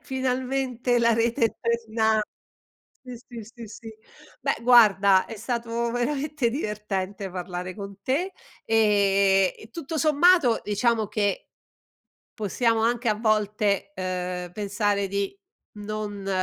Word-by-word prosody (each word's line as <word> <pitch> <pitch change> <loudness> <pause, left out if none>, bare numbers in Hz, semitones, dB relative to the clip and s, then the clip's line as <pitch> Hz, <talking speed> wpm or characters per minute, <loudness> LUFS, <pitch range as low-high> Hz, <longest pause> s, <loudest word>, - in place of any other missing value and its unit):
"Finalmente 260 -1 -1
la 235 -1 +3
rete 230 +1 +1
è - - -8
torna" 225 -2 +1 0.8
sì, 250 -1 -8
sì, 235 -1 -10
sì, 235 +1 -11
sì. 225 +1 -10 0.5
Beh, - - 0
guarda 200 -6 +6
è 225 - -8
stato 235 +1 -2
veramente 275 +1 -1
divertente 205 -5 -4
parlare 180 0 -5
con 200 -1 -9
te 330 +9 -1 0.3
e 200 -3 +3
e 220 - -14
tutto 320 +4 -6
sommato, 310 -4 +4
diciamo 220 +1 +1
che, 205 -3 -1 0.9
possiamo 225 +2 0
anche 235 +1 +1
a 215 - +3
volte, 210 -2 0
uhm, 180 -1 -4
pensare 205 0 -1
di 200 - -2 0.4
non 205 -1 -5
220 Hz, 115 wpm, -25 LUFS, 200-240 Hz, 0.9 s, guarda